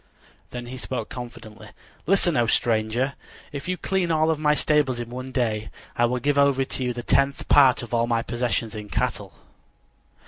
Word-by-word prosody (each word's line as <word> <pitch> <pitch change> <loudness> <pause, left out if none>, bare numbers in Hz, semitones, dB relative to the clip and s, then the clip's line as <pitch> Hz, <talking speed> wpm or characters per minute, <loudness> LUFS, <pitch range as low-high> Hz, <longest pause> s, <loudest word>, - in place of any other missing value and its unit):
Then 120 -1 -6
he 125 +2 -7
spoke 125 -3 -4
confidently: 120 -4 -9 0.4
"Listen, 185 -2 +3
O 120 -1 +2
stranger. 115 +4 +1 0.4
If 140 +2 -6
you 185 0 -1
clean 190 -2 -1
all 160 0 +2
of 155 - -2
my 150 -1 +3
stables 145 -5 +2
in 120 0 -6
one 130 +1 -6
day, 110 -4 -1 0.3
I 120 - +3
will 125 +1 0
give 140 +2 +1
over 140 -1 +3
to 130 - -4
you 125 - 0
the 120 0 -6
tenth 140 +3 +1
part 135 -4 +6
of 120 - -9
all 115 0 +2
my 115 -1 0
possessions 120 -2 -2
in 105 -1 -7
cattle." - - -2
125 Hz, 185 wpm, -24 LUFS, 120-140 Hz, 0.4 s, part